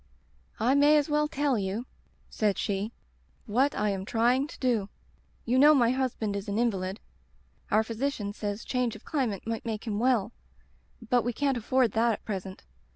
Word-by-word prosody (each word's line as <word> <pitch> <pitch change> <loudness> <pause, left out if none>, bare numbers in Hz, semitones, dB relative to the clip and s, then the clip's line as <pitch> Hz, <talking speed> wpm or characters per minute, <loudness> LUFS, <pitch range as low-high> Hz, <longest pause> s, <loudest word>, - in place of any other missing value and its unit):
"*I 240 +5 +3
may 290 +2 +5
as 295 0 +1
well 300 0 +2
tell 285 -5 0
you/ 200 +5 -3 0.4
said 210 -3 0
she, 205 +1 -2 0.5
*what 260 +7 +1
I 210 0 +1
am 190 -1 -3
trying 245 +6 +2
to - - -11
do. 230 -6 0 0.6
You 250 +2 +2
know 300 +2 +7
my 240 -3 +4
husband 250 -5 -1
is 200 +1 -4
an 200 - -1
invalid. 195 -4 -1 0.7
Our 215 0 +3
physician 225 -2 -3
says 205 0 -4
change 250 -3 -1
of 215 - -13
climate 245 -10 -2
might 225 +1 -3
make 225 -2 -4
him 210 -2 -2
well, 240 -4 +2 0.8
but 245 +1 +3
we 240 +1 -2
can't 275 +2 0
afford 245 0 +1
that 230 +2 +2
at - - -8
present. 190 -2 -5
230 Hz, 175 wpm, -28 LUFS, 210-260 Hz, 0.8 s, know